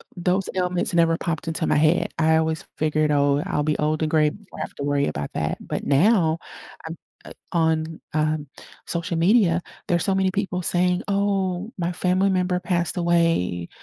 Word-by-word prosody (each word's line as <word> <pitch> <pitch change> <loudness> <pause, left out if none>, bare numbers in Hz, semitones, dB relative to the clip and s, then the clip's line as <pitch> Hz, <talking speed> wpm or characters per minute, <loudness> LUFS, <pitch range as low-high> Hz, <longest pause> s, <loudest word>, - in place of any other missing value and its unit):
those 180 +2 0
ailments 180 -1 0
never 165 -1 +3
popped 165 -2 -3
into 160 0 -1
my - - +2
head. 155 +3 +2
I 160 0 +4
always 160 0 -1
figured, 155 -1 +1
"Oh, 145 0 +2
I'll 150 - -1
be 150 0 0
old 155 +1 0
and 155 - -1
gray 155 -1 +4
before 200 +5 -13
I - - -3
have - - -6
to 140 - -5
worry 145 0 +1
about 70 0 -4
that." - - -2
But - - -4
now, 165 +2 +3 0.5
a - - -5 0.4
uh, - - -10 0.2
on, 160 -1 0
um, 155 -1 0 0.4
social 170 0 -3
media, 175 -1 +3 0.3
there's 175 -1 +1
so 195 - +1
many 190 0 +2
people 195 -2 -2
saying, 180 +1 +2
"Oh, 200 0 -1
my 170 0 -1
family 185 +3 +1
member 180 -1 0
passed 175 -2 -1
away," 165 - +1
170 Hz, 180 wpm, -23 LUFS, 155-180 Hz, 0.5 s, I